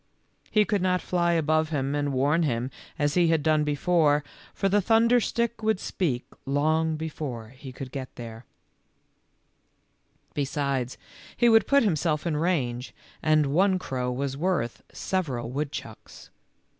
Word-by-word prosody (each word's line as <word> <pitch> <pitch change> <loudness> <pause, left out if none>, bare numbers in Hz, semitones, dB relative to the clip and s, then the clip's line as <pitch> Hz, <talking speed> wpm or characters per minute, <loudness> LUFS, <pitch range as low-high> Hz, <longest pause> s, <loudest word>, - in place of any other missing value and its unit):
He 215 -1 +3
could 205 -3 0
not 180 0 +2
fly 175 -1 +1
above 155 -1 +2
him 140 -3 -1
and 145 -1 0
warn 140 +5 +2
him 125 -4 -1 0.3
as 145 -1 +1
he 175 0 +4
had 160 -2 +2
done 155 -1 +3
before, 150 0 +2 0.3
for 195 - -1
the 205 +2 +3
thunderstick 235 +1 +2
would 220 -3 +1
speak 135 -13 -2 0.2
long 155 +3 +1
before 145 -8 -5
he 130 +1 -11
could 130 0 -8
get 135 -2 -5
there; 115 -1 -8 1.9
besides, 140 -3 -2 0.4
he 240 - +4
would 225 -1 +5
put 280 -1 +4
himself 160 -5 0
in 165 -3 0
range, 140 -7 -1 0.3
and 155 -1 +3
one 190 +3 +4
crow 125 -7 -3
was 135 +2 -2
worth 155 -7 -1
sev 185 -3 -2
eral 120 -3 -4
woodchucks. 145 +2 -6
155 Hz, 145 wpm, -26 LUFS, 135-180 Hz, 1.9 s, would